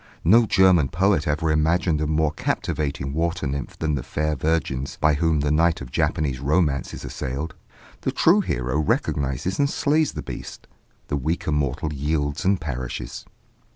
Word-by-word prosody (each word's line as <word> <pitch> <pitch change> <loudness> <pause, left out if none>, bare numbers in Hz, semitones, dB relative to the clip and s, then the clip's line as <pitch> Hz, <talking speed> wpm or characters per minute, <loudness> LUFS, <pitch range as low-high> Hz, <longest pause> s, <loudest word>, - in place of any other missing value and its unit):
No 110 +6 +5
German 95 -8 +5
poet 90 -2 +2
ever 80 +2 +1
imagined 80 +1 +2
a 75 - 0
more 80 0 +1
captivating 70 -2 -2
water 85 +1 -1
nymph 70 +1 -4
than 80 -1 -1
the 70 - -1
fair 75 +4 -2
virgins 70 -2 -1
by 75 0 +4
whom 80 0 +1
the 75 0 0
knight 80 +2 +3
of 60 -3 -9
Japanese 70 -5 0
romance 70 -1 +1
is - - -8
assailed: 70 +5 -4 0.5
the - - -1
true - - +4
hero 65 +4 -1
recognizes 70 +3 -1
and 140 0 +3
slays 150 +2 +1
the 75 - -5
beast; - - -8 0.4
the 70 - 0
weaker 80 +3 -2
mortal 75 +1 -1
yields 75 +1 -1
and 95 0 +2
perishes. 65 -5 -5
75 Hz, 160 wpm, -23 LUFS, 70-85 Hz, 0.5 s, No